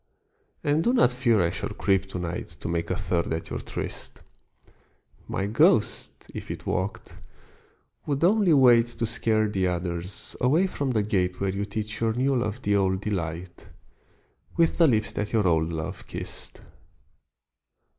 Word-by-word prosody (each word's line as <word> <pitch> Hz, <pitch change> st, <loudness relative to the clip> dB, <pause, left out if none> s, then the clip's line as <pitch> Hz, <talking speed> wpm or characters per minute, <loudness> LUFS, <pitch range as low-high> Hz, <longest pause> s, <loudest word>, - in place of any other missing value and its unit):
And 150 Hz, +2 st, +2 dB
do 240 Hz, -, +2 dB
not 125 Hz, -, +4 dB
fear 120 Hz, -6 st, +3 dB
I 85 Hz, -, +1 dB
shall -, -, -4 dB
creep 95 Hz, -1 st, +1 dB
to 95 Hz, -, -6 dB
night 90 Hz, -1 st, -4 dB
To -, -, -4 dB
make 85 Hz, 0 st, -2 dB
a -, -, 0 dB
third 85 Hz, -1 st, -1 dB
at 80 Hz, -, -4 dB
your -, -, -2 dB
tryst: -, -, -6 dB, 1.1 s
My 95 Hz, -, -2 dB
ghost, 105 Hz, +3 st, +2 dB
if -, -, -7 dB
it -, -, -6 dB
walked, 95 Hz, +2 st, -3 dB, 0.9 s
would 140 Hz, 0 st, -1 dB
only 200 Hz, 0 st, +4 dB
wait 120 Hz, -5 st, +6 dB
To 115 Hz, -1 st, -3 dB
scare 110 Hz, -1 st, +1 dB
the 95 Hz, -3 st, 0 dB
others 90 Hz, +1 st, -3 dB
away 150 Hz, +9 st, +4 dB
from 145 Hz, -7 st, -2 dB
the 110 Hz, -4 st, +1 dB
gate 90 Hz, -3 st, 0 dB
Where 100 Hz, -1 st, 0 dB
you 100 Hz, +1 st, -2 dB
teach 105 Hz, +1 st, -4 dB
your 115 Hz, -1 st, +2 dB
new 130 Hz, +3 st, +1 dB
love 120 Hz, 0 st, -2 dB
the 100 Hz, 0 st, +2 dB
old 95 Hz, -1 st, +1 dB
delight, 85 Hz, -3 st, -4 dB, 0.9 s
With 165 Hz, +1 st, +2 dB
the 165 Hz, -, +7 dB
lips 110 Hz, -5 st, +1 dB
that 105 Hz, +2 st, -3 dB
your 105 Hz, -4 st, +3 dB
old 80 Hz, -1 st, +2 dB
love 80 Hz, -2 st, -5 dB
kissed. -, -, -5 dB
105 Hz, 165 wpm, -26 LUFS, 90-125 Hz, 1.1 s, the